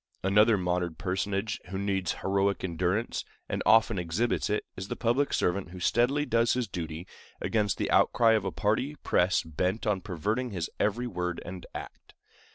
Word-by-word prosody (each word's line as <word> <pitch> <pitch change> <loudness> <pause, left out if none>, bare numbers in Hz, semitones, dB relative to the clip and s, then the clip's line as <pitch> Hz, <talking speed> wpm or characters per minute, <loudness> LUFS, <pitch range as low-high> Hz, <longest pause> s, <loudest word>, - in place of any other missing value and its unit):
Another 105 +3 +5
modern 90 -2 -1
personage 95 +4 -2
who 95 - -4
needs 95 -2 0
heroic 100 0 +1
endurance, 90 +5 -1 0.2
and - - -2
often 110 -2 +5
exhibits 90 +10 0
it, 105 - 0
is 95 +1 -6
the - - -3
public 125 +5 +1
servant 90 +1 0
who 90 +1 -9
steadily 125 +10 +2
does 115 -3 +2
his 125 -2 -1
duty 85 -2 -5 0.3
against 105 -3 0
the - - -1
outcry 115 -1 +4
of 110 -3 +3
a 95 - -2
party 110 +11 0
press 90 +2 +2
bent 90 +8 -2
on 105 -3 +1
perverting 105 +7 -2
his 90 -6 -4
every 110 +4 +1
word 90 -6 -3
and 90 0 -8
act. - - -9
100 Hz, 165 wpm, -29 LUFS, 90-115 Hz, 0.3 s, Another